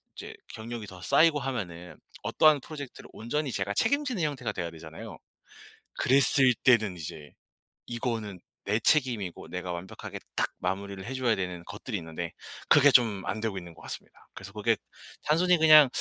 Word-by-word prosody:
이제 - - -8 0.2
경력이 115 -1 -7
더 95 -2 -11
쌓이고 155 - +4
하면은 95 -10 -5 0.3
어떠한 155 -2 +4
프로젝트를 145 -2 -9
온전히 135 +6 -2
제가 100 -2 -2
책임지는 260 -3 +1
형태가 145 -3 -2
돼야 85 -2 -4
되잖아요. 80 0 -10 0.8
그랬을 130 -1 +4
때는 110 -7 +4
이제 75 -2 -8 0.5
이거는 115 -5 -3 0.2
내 105 +2 +1
책임이고 115 - +1
내가 90 0 -4
완벽하게 90 +2 -7 0.2
딱 - - +1
마무리를 95 +1 -4
해 130 - -5
줘야 130 -3 +1
되는 90 -2 -4
것들이 105 +3 -5
있는데 80 0 -5 0.4
그게 145 - +7
좀 110 -7 +4
안 110 - -2
되고 110 -4 -2
있는 85 -2 -12
것 - - -16
같습니다. - - -9
그래서 - - -10
그게 - - +2 0.5
단순히 175 +4 +3
그냥 155 -2 +9
110 Hz, 365 characters per minute, -28 LUFS, 90-135 Hz, 0.8 s, 그냥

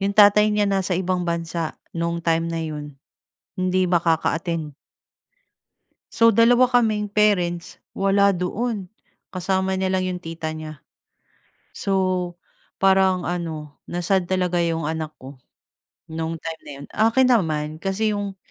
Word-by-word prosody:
'Yong 200 +1 -1
tatay 210 +1 +7
niya 210 0 +2
nasa 195 -1 0
ibang 185 -1 -1
bansa 170 0 -2 0.4
no'ng 170 0 -1
time 165 0 +2
na 165 - -2
'yon. 150 -1 -5 0.7
Hindi 185 0 +1
makaka-attend. 165 -2 0 1.4
So 230 - +4
dalawa 245 +2 +5
kaming 220 -4 +2
parents 185 -4 +1 0.2
wala 195 0 +3
doon. 200 +2 -3 0.4
Kasama 190 0 -1
niya 190 - 0
lang 185 - 0
'yong 185 -1 -3
tita 165 -2 -5
niya. 155 -2 -8 0.9
So 185 -2 -1 0.4
parang 190 -2 +3
ano 160 -4 -5
na-sad 175 +1 0
talaga 180 -2 +1
'yong 165 -2 0
anak 155 0 -4
ko, 130 0 -12 0.7
no'ng 165 0 -3
time 160 0 -7
na - - -12
'yon. 140 +1 -10
Akin 225 +4 +3
naman 155 -9 +1
kasi 210 +3 0
'yong 200 -1 -4
180 Hz, 130 wpm, -23 LUFS, 165-195 Hz, 1.4 s, tatay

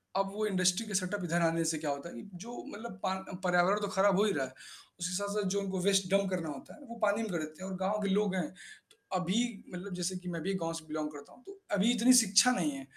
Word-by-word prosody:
अब 195 0 +1
वो 215 +1 -1
इंडस्ट्री 185 +1 +2
के 210 - -6
सेटअप 185 +1 -1
इधर 170 0 +1
आने 165 0 +2
से 160 - -2
क्या 150 -1 -3
होता 140 +4 -5
है, - - -7
जो 225 +7 -8
मतलब 205 -2 -8
पा 190 - +1 0.3
पर्यावरण 180 +3 +3
तो 205 - -1
ख़राब 195 0 +4
हो - - +5
ही 210 - +3
रहा 135 - 0
है। 130 - -11 0.5
उसके 180 +1 -2
साथ-साथ 200 +1 -1
जो - - +2
उनको 190 -1 -3
वेस्ट 195 -1 +3
डम्प 195 0 +3
करना 175 -4 -2
होता 140 - -8
है, - - -17
वो 235 - -7
पानी 210 +2 +3
में 215 - -4
कर 170 - -1
देते 155 +3 -7
हैं 190 - -5
और 190 - -4
गाँव 210 +2 0
के 200 - 0
लोग 200 -1 +2
हैं। 180 - 0
त 180 - -18 0.2
अभी 185 +3 0 0.4
मतलब 180 +2 -6
जैसे 180 +1 -2
कि 180 - -5
मैं 170 -2 -4
भी 195 +4 -1
गाँव 165 0 -2
से 165 -1 -7
बिलोंग 155 0 -2
करता 145 -1 -12
हूँ 245 - -20
तो, 390 0 -12
अभी 205 +3 +3
इतनी 245 +2 +5
शिक्षा 225 0 +7
नहीं 170 -11 +1
है 135 -1 -7
190 Hz, 275 wpm, -32 LUFS, 170-205 Hz, 0.5 s, शिक्षा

